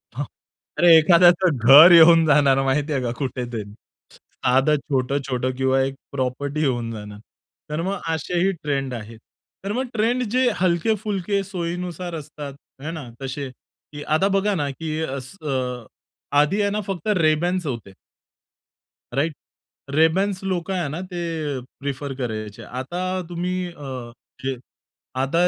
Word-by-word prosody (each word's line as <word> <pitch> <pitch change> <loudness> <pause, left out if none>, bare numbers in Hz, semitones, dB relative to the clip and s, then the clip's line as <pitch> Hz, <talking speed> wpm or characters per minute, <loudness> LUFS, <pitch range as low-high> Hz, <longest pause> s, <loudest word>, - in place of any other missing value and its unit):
हां, 145 +3 -2 0.5
अरे 170 +1 +7
एखाद्याचं 175 0 +5
घर 150 +6 +11
येऊन 165 -1 +8
जाणार 140 -3 +4
माहिती 145 +3 0
आहे 135 - 0
का 120 - -1
कुठे 130 -3 -3
तरी. 110 -2 -3 0.5
साधं 135 +4 +1
छोटं-छोटं 130 -2 -1
किंवा 130 0 +2
एक 135 0 -3 0.2
प्रॉपर्टी 140 +3 -2
येऊन 120 -5 0
जाणार. 105 -2 -8 0.5
तर 150 +2 -2
मग 195 +3 -2 0.2
असेही 175 +4 0
ट्रेंड 135 -3 -1
आहेत. 115 -1 -8 0.4
तर 195 - -3
मग 255 +3 -1
ट्रेंड 235 +3 +1
जे 255 +1 +3
हलके-फुलके 195 +2 0
सोयीनुसार 175 -2 -4
असतात, 150 -2 -7 0.3
हे 155 +3 -4
ना 155 -7 -7
तसे. 135 +1 -4 0.4
की 145 0 -7
आता 155 +7 +2
बघा 200 +1 +1
ना, 145 -5 -1
की 155 +2 -4
असं 140 +4 -6
अ, 125 -3 -2 0.5
आधी 165 +8 +3
आहे 200 - +2
ना, 210 - -1
फक्त 195 -2 -4
Rayban's 170 +3 +1
होते. 115 -7 -5 1.2
राइट? 155 +4 +1 0.6
Rayban's 185 +5 +2
लोकं 185 -1 -2
आहे 175 -5 -1
ना, 155 +5 -4
ते 180 -1 -6 0.4
अ, 125 - -6 0.2
प्रिफर 140 0 -4
करायचे. 110 -5 -5
आता 130 +9 -5 0.3
तुम्ही 180 +1 -2
अ, 130 -6 -7 0.3
जे 135 -1 -2 0.6
आता 165 +7 +2
150 Hz, 140 wpm, -22 LUFS, 135-180 Hz, 1.2 s, घर